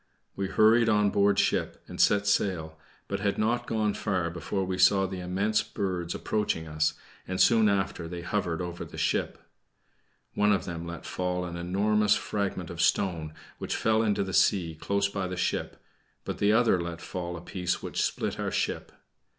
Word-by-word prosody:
We 100 - -2
hurried 110 +4 +4
on 105 -2 +3
board 100 0 +3
ship - - 0
and - - -3
set 105 0 +4
sail, 90 -6 0 0.3
but 100 - -3
had 100 0 0
not 120 +3 0
gone 110 -3 0
far 90 -5 -1
before 95 +3 -3
we 95 0 -3
saw 95 -1 +5
the 95 0 -5
immense 100 +5 0
birds 90 -5 -3
approaching 105 -7 -1
us, 75 0 0 0.3
and 95 0 -3
soon 110 -2 +5
after 95 -4 -1
they 85 0 -6
hovered 90 -2 -1
over 85 0 -5
the - - -10
ship. - - 0 1.0
One 105 0 +3
of 95 - -1
them 85 -1 -5
let 85 0 -7
fall 90 0 -2
an 85 -1 -6
enormous 105 +4 +2
fragment 100 -4 -3
of 85 -1 -4
stone, 80 -5 +1 0.2
which - - -3
fell 110 0 +2
into 105 -3 +1
the 95 -1 -5
sea 85 -5 +3
close 100 +5 0
beside 100 -2 -3
the 90 - -5
ship, 90 - -2 0.5
but - - -4
the 100 0 +3
other 110 -5 +3
let 85 -1 -5
fall 90 -1 -5
a - - -9
piece 90 0 -3
which - - -2
split - - -2
our - - -1
ship. - - -2
95 Hz, 185 wpm, -28 LUFS, 85-105 Hz, 1.0 s, saw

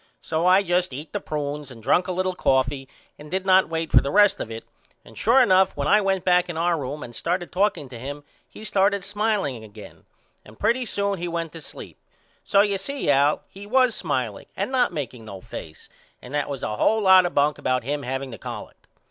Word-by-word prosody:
So 165 +2 -1
I 190 +2 +5
just 180 -4 0
eat 145 +4 -8
the - - -1
prunes 150 -1 -4
and 115 -4 -12
drunk 175 - +2
a - - -2
little 185 +1 -1
coffee 135 -3 0 0.3
and 150 0 -11
did 190 +3 -2
not 190 -2 +5
wait 165 0 -3
for - - +6
the 140 - -3
rest 205 +4 +4
of - - -5
it 115 0 -7 0.4
and - - -15
sure 235 +4 +4
enough 190 - +4
when 140 0 -1
I 210 +7 +5
went 195 -2 0
back 180 -1 +3
in 170 - -4
our 170 +1 +2
room 145 0 -5
and 120 - -10
started 175 +5 -2
talking 180 -6 0
to 120 -2 -9
him 145 +4 -7 0.3
he - - -12
started 200 -1 +1
smileing 205 - -1
again 105 -2 -13 0.4
and 105 +1 -16
pretty 250 +2 +1
soon 200 -3 -2
he 175 - -3
went 170 -1 -3
to 165 - -10
sleep - - -11 0.4
so 200 - +4
you 200 -1 0
see 275 - -1
Al 140 +2 +3
he 200 +1 -12
was 255 +1 +3
smileing 130 - -3
and 200 +6 -2
not 250 -2 +2
makeing 125 -5 -6
no 100 -3 -8
face 80 -3 -10 0.3
and 125 - -12
that 145 - -1
was 140 -2 -5
a 105 - -3
hole 220 - +2
lot 190 -2 +6
of - - -9
bunk 145 +1 +2
about 130 -1 0
him 145 +3 -2
haveing 135 0 -4
the 110 - -9
collect. - - -9
165 Hz, 225 wpm, -24 LUFS, 135-195 Hz, 0.4 s, for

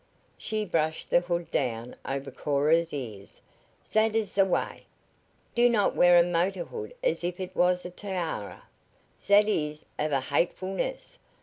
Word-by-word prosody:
She 215 -1 -3
brushed 160 -3 -1
the - - +6
hood 175 -1 -3
down 120 -2 -2
over 135 0 -4
Cora's 155 +4 +1
ears. 110 -8 -7 0.5
"Zat 220 0 +2
is 215 -3 0
ze 195 - +4
way. 190 -2 -1 0.7
Do 240 0 +5
not 215 -4 +2
wear 175 0 +6
a 170 - +7
motor 175 +2 0
hood 455 +2 -8
as - - 0
if 175 +1 -3
it 185 0 -6
was 180 0 +2
a 180 - -6
tiara! 175 - -5 0.6
Zat 205 +1 +5
is 150 -7 -2
of 150 0 0
a 140 - +2
hatefulness! 185 - -2
175 Hz, 150 wpm, -28 LUFS, 150-200 Hz, 0.7 s, a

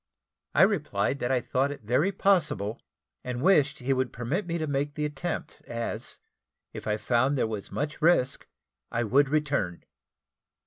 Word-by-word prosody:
I - - +7
replied 140 - +1
that 120 - -1
I 130 -2 +2
thought 135 +4 0
it 145 - -8
very 130 - +2
possible, 150 - +1 0.4
and 125 -1 -4
wished 145 -3 +4
he 135 +1 0
would 130 -1 0
permit 145 - -2
me 170 0 -1
to 160 - -1
make 145 0 -1
the 150 - -1
attempt, 155 +1 -4
as, 115 0 -4 0.6
if - - -7
I 105 0 +1
found 130 +5 +2
there - - +2
were 110 -2 -3
much 150 +2 -3
risk, 155 -5 +3 0.4
I 120 0 0
would 135 +5 +3
return. 140 - 0
140 Hz, 165 wpm, -28 LUFS, 120-150 Hz, 0.6 s, I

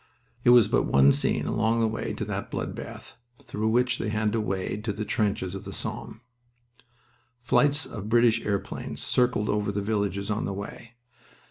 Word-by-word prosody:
It - - +4
was 120 -3 +7
but - - +1
one 70 +1 +6
scene 70 +1 0
along 115 +1 +1
the 115 - +3
way 110 - -3
to - - -4
that - - -4
blood - - -3
bath - - -9 0.2
through 110 +1 -3
which 125 +2 +2
they 110 - -2
had 110 0 0
to 115 0 0
wade 95 +1 -3
to 105 - -1
the 105 +2 -4
trenches 100 -4 -1
of 95 - -6
the - - -7
Somme. 110 - -5 1.2
Flights 145 +5 +3
of 105 -1 -7
British 115 0 +4
airplanes 100 -2 -3
circled 125 -4 +1
over 105 -1 0
the 100 - -2
villages 100 -1 -1
on 105 - -1
the 100 - -3
way. 105 +4 -8
105 Hz, 185 wpm, -26 LUFS, 100-115 Hz, 1.2 s, was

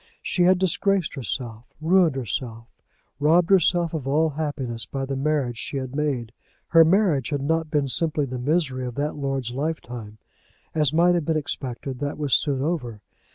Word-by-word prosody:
She 180 - 0
had 185 +1 +5
disgraced 190 0 +1
herself, 120 -4 -5
ruined 165 -1 +3
herself, 115 -1 -4 0.5
robbed 165 +5 +3
herself 175 -2 +3
of 145 -5 -4
all 155 +3 +2
happiness 135 -7 -4
by 135 -1 -3
the 135 0 -3
marriage 135 -4 -1
she 140 - -3
had 130 0 -5
made. 135 -7 -1 0.4
Her 165 -1 +7
misery 175 -4 +3
had 145 -2 -2
not 160 +2 0
been 145 -2 +1
simply 150 +3 +1
the 130 -1 -5
misery 135 -2 0
of 120 - -7
that 145 +2 -2
lord's 135 -4 -2
lifetime. 125 -6 -5 0.6
As 150 -3 +2
might 170 +3 +4
have 170 -4 0
been 160 0 +1
expected, 130 -3 -4
that 145 0 -3
was 145 -3 -1
soon 135 -3 +2
over. 125 -10 -3
145 Hz, 170 wpm, -24 LUFS, 130-160 Hz, 0.6 s, Her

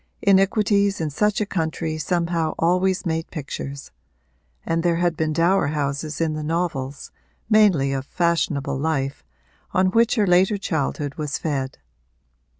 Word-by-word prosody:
Iniquities 200 +1 +3
in 155 -2 -2
such 210 +7 +1
a - - +1
country 160 -3 -2
somehow 170 -2 -1
always 185 +3 +1
made 165 -1 -2
pictures; 140 -2 -6 0.7
and 165 0 0
there 170 0 +2
had 175 0 +1
been 155 0 -1
dower 170 +2 +2
houses 145 0 -2
in 165 -2 0
the 155 - -4
novels, 150 -4 -3 0.4
mainly 185 -11 +4
of 135 -1 -2
fashionable 150 -5 0
life, 140 -3 -2 0.5
on 185 0 +3
which 230 +3 +3
her 215 -4 +3
later 190 +3 +3
childhood 145 -5 -2
was 150 -2 -2
fed. 135 -4 -3
165 Hz, 140 wpm, -22 LUFS, 150-185 Hz, 0.7 s, mainly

